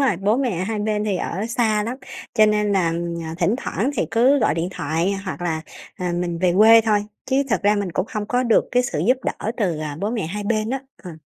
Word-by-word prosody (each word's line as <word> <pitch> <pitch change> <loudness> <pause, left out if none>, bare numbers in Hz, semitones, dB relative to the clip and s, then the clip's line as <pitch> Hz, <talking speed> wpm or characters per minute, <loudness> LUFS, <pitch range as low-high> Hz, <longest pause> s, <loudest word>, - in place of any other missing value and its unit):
rồi. 260 -10 +2
Bố 205 +5 +1
mẹ 220 -10 -1
hai 215 +1 -3
bên 210 0 -1
thì 200 -3 0
ở 195 +5 -3
xa 220 -3 +1
lắm, 240 +4 -4 0.4
cho 215 -2 +6
nên 210 -1 +1
là, 175 -4 +2 0.3
à, 160 0 -5
thỉnh 195 +5 +2
thoảng 260 0 -2
thì - - 0
cứ 255 +5 +4
gọi 215 - +2
điện 170 +2 -1
thoại 165 +4 -1
hoặc 185 -1 -5
là, 160 -2 -2 0.3
à, 180 -1 -2
mình 175 -1 -2
về 180 0 +2
quê 225 +2 +8
thôi. 210 -2 +1 0.2
Chứ 270 +1 +2
thật 235 - +1
ra 205 +1 +4
mình 200 -4 -2
cũng 185 - -1
hông 210 -1 -3
có 250 +2 +1
được 230 -3 +3
cái 250 0 +4
sự 195 - -3
giúp 255 +2 +4
đỡ 215 - -2
từ, 180 -8 0
à, 150 -2 -5
bố 205 +2 -1
mẹ 220 -9 -2
hai 205 +4 -4
bên 215 +1 0
á, 270 0 -2 0.2
ờ. 175 -4 -9
210 Hz, 250 wpm, -22 LUFS, 180-225 Hz, 0.4 s, quê